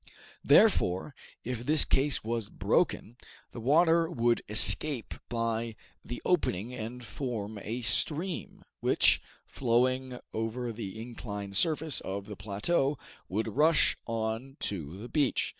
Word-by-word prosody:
Therefore, 145 Hz, -, +4 dB, 0.3 s
if 125 Hz, -1 st, -3 dB
this 150 Hz, +3 st, +5 dB
case 140 Hz, +1 st, +1 dB
was 115 Hz, -1 st, -2 dB
broken, 120 Hz, +3 st, 0 dB, 0.3 s
the -, -, -8 dB
water 165 Hz, +6 st, +4 dB
would 120 Hz, -7 st, +1 dB
escape 120 Hz, +4 st, +2 dB, 0.2 s
by 115 Hz, -1 st, -2 dB, 0.3 s
the 120 Hz, -, -7 dB
opening 125 Hz, -, 0 dB
and 125 Hz, +1 st, -6 dB
form 110 Hz, -4 st, -4 dB
a 115 Hz, +5 st, -5 dB
stream, 155 Hz, -, -1 dB, 0.2 s
which, -, -, +4 dB, 0.2 s
flowing 130 Hz, +1 st, 0 dB, 0.2 s
over 115 Hz, +2 st, -3 dB
the 110 Hz, -1 st, -6 dB
inclined 105 Hz, -4 st, -6 dB
surface 155 Hz, -, +2 dB
of 100 Hz, +1 st, -5 dB
the 105 Hz, 0 st, -8 dB
plateau, 120 Hz, -, 0 dB, 0.3 s
would 110 Hz, +4 st, -1 dB
rush 150 Hz, +8 st, +3 dB
on 115 Hz, +4 st, -3 dB
to 85 Hz, -3 st, -3 dB
the 110 Hz, +4 st, -8 dB
beach. 140 Hz, +1 st, +1 dB
120 Hz, 125 wpm, -30 LUFS, 110-135 Hz, 0.3 s, this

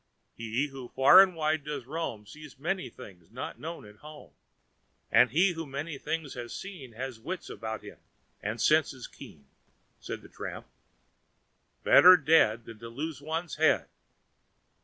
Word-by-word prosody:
"He 115 Hz, +4 st, -2 dB
who 135 Hz, -2 st, -9 dB
far 140 Hz, +8 st, +8 dB
and 190 Hz, -2 st, +2 dB
wide 155 Hz, -1 st, 0 dB
does 145 Hz, -4 st, -5 dB
roam 135 Hz, -7 st, -5 dB
sees 150 Hz, +5 st, -13 dB
many 175 Hz, +7 st, -3 dB
things 90 Hz, -4 st, -14 dB
not 125 Hz, +3 st, -7 dB
known 165 Hz, -3 st, -7 dB
at 105 Hz, 0 st, -15 dB
home; 150 Hz, -, -13 dB, 0.8 s
and -, -, +6 dB
he 180 Hz, +5 st, +3 dB
who 165 Hz, -2 st, -6 dB
many 140 Hz, +2 st, -5 dB
things 160 Hz, -4 st, -4 dB
has 120 Hz, -1 st, -7 dB
seen 170 Hz, -12 st, -9 dB
has 125 Hz, 0 st, -6 dB
wits 175 Hz, +10 st, -6 dB
about 110 Hz, -2 st, -6 dB
him -, -, -12 dB, 0.4 s
and 110 Hz, +3 st, -4 dB
senses 150 Hz, -2 st, +2 dB
keen," 70 Hz, -, -13 dB, 0.5 s
said -, -, -7 dB
the -, -, -12 dB
tramp. -, -, -8 dB, 1.2 s
"Better 185 Hz, 0 st, +8 dB
dead 135 Hz, -8 st, +3 dB
than 115 Hz, -2 st, -11 dB
lose 140 Hz, +7 st, -6 dB
one's 160 Hz, +2 st, -4 dB
head! -, -, +2 dB
140 Hz, 150 wpm, -29 LUFS, 115-160 Hz, 1.2 s, far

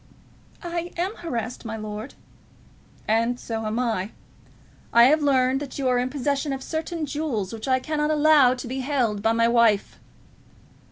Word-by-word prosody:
"I 345 Hz, 0 st, -4 dB
am 375 Hz, +5 st, -2 dB
harassed, 245 Hz, -8 st, -4 dB
my 225 Hz, -1 st, -5 dB
lord." 215 Hz, +3 st, -7 dB, 0.9 s
"And 230 Hz, +3 st, +1 dB
so 225 Hz, -1 st, -4 dB
am 215 Hz, +2 st, -2 dB
I. 225 Hz, -6 st, -1 dB, 0.8 s
I 235 Hz, -, +7 dB
have 300 Hz, +5 st, +5 dB
learned 265 Hz, -2 st, +2 dB
that 285 Hz, -2 st, -7 dB
you 270 Hz, -2 st, -1 dB
are 250 Hz, -1 st, +2 dB
in 250 Hz, +1 st, -1 dB
possession 280 Hz, +1 st, -1 dB
of 265 Hz, 0 st, -5 dB
certain 320 Hz, 0 st, -3 dB
jewels 270 Hz, -10 st, -3 dB
which 225 Hz, +3 st, -6 dB
I 260 Hz, 0 st, +3 dB
cannot 300 Hz, +2 st, -1 dB
allow 300 Hz, -4 st, +5 dB
to 250 Hz, -, -7 dB
be 260 Hz, +2 st, -4 dB
held 250 Hz, -7 st, 0 dB
by 225 Hz, +2 st, +2 dB
my 230 Hz, 0 st, +3 dB
wife." 230 Hz, -4 st, +2 dB
255 Hz, 165 wpm, -24 LUFS, 230-295 Hz, 0.9 s, I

